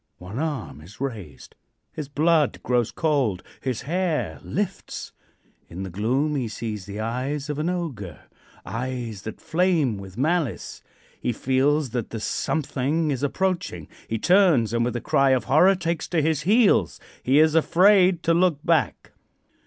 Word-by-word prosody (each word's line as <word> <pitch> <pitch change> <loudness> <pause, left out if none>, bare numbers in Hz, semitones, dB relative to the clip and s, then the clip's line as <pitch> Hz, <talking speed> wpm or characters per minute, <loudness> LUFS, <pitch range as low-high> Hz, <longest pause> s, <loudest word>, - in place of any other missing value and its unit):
One 95 +7 -7
arm 145 - -4
is 90 +7 -15
raised. 105 - -6 0.4
His 150 -3 -6
blood 155 0 +2
grows 120 -2 +1
cold, 135 - 0 0.2
his 130 -4 -3
hair 155 - -1
lifts. - - -4 0.6
In 90 +3 -6
the 95 - -6
gloom 130 - 0
he 130 -4 -1
sees 110 -3 -5
the 100 +1 -6
eyes 135 +6 -3
of 150 - -4
an 160 +3 0
ogre 130 - -5 0.4
eyes 115 -1 -4
that 110 - -7
flame 160 - +1
with 95 0 -11
malice. 155 -1 -1 0.4
He - - 0
feels 135 +3 +1
that 120 -2 -3
the 115 - -5
something 145 +6 -1
is 135 - -2
approaching. 145 - -2 0.2
He 115 - -1
turns, 170 - +4
and 115 0 +1
with 120 +1 -2
a 120 - -2
cry 135 0 +2
of 120 - -5
horror 175 - +5
takes 170 -3 -2
to 165 -2 +1
his 155 -1 +1
heels. 205 - +3 0.2
He 130 +3 +2
is 155 0 +5
afraid 180 +2 +4
to 165 - +3
look 175 -2 +3
back. 165 -2 +1
135 Hz, 155 wpm, -24 LUFS, 115-160 Hz, 0.6 s, horror